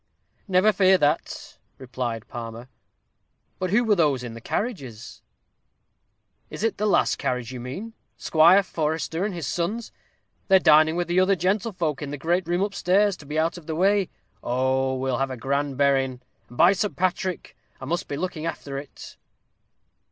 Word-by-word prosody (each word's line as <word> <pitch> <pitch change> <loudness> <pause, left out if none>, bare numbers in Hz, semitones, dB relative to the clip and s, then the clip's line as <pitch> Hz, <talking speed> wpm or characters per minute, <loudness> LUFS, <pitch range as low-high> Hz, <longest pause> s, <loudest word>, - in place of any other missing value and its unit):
"Never 190 +3 +4
fear 190 -1 +5
that," 150 -2 -1 0.2
replied 120 -3 -5
Palmer. 115 +1 -8 0.9
"But 185 - -1
who 225 +6 +3
were 220 -3 +3
those 150 -9 +2
in 120 -2 -6
the 115 - -10
carriages?" 135 - -5 1.3
"Is - - -7
it 225 -3 0
the 210 - +1
last 205 - +2
carriage 125 -1 -2
you 130 - -7
mean? 165 - -7 0.2
Squire 170 +5 +5
Forester 160 0 -2
and 210 - -1
his 170 -4 -4
sons. 190 +10 -3 0.6
They're 190 - +7
dining 155 -2 +5
with 175 0 -1
the 175 +1 +2
other 190 +1 +4
gentlefolk, 180 -4 -1
in 145 - -4
the 145 - -5
great 170 +5 0
room 175 +2 +1
up 200 0 -2
stairs, 195 +2 +2
to 145 - -14
be 150 +2 -4
out 165 +2 0
of 165 - -19
the 160 - -3
way. 195 +2 +2 0.3
Oh, 130 +1 0
we'll 130 -1 -1
have 135 0 0
a 130 - -6
grand 140 +2 -2
berrin'. 135 -2 +1 0.3
And, 120 - -13
by 180 +3 +6
St. 205 +1 -2
Patrick! 185 0 -2 0.2
I 130 - -7
must 170 +5 -2
be 140 - -4
looking 165 -2 -3
after 140 -4 -5
it." 140 0 -12
160 Hz, 175 wpm, -24 LUFS, 135-185 Hz, 1.3 s, They're